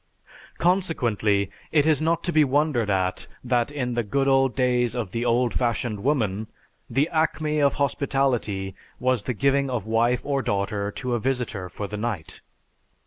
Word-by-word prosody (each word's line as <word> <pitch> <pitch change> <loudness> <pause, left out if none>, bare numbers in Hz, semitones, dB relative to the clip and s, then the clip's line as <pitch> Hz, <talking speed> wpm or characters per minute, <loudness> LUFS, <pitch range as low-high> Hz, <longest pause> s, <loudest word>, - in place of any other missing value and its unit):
Consequently, 120 - +1 0.2
it 150 -2 +4
is 155 -2 +3
not 165 +1 +1
to 175 - -1
be 155 -2 +5
wondered 140 -5 +1
at 95 -2 0 0.2
that 125 +1 +1
in 125 -4 -2
the 120 - +1
"good 135 +6 0
old 135 -2 +3
days 125 -2 +1
of 115 -7 -3
the 115 +3 -2
old 120 0 +2
fashioned 115 -3 -1
woman," 110 -7 0 0.4
the 135 +6 +2
acme 155 -1 0
of 140 -1 +3
hospitality 130 -8 0 0.3
was 130 -2 +1
the 125 - -3
giving 140 +3 +2
of 120 -6 -2
wife 115 +2 +2
or 140 -1 0
daughter 100 -1 -1
to 125 +4 -4
a 120 - +1
visitor 120 -7 -2
for 100 - -5
the 105 +1 -5
night. 105 -7 -4
125 Hz, 165 wpm, -24 LUFS, 110-140 Hz, 0.4 s, be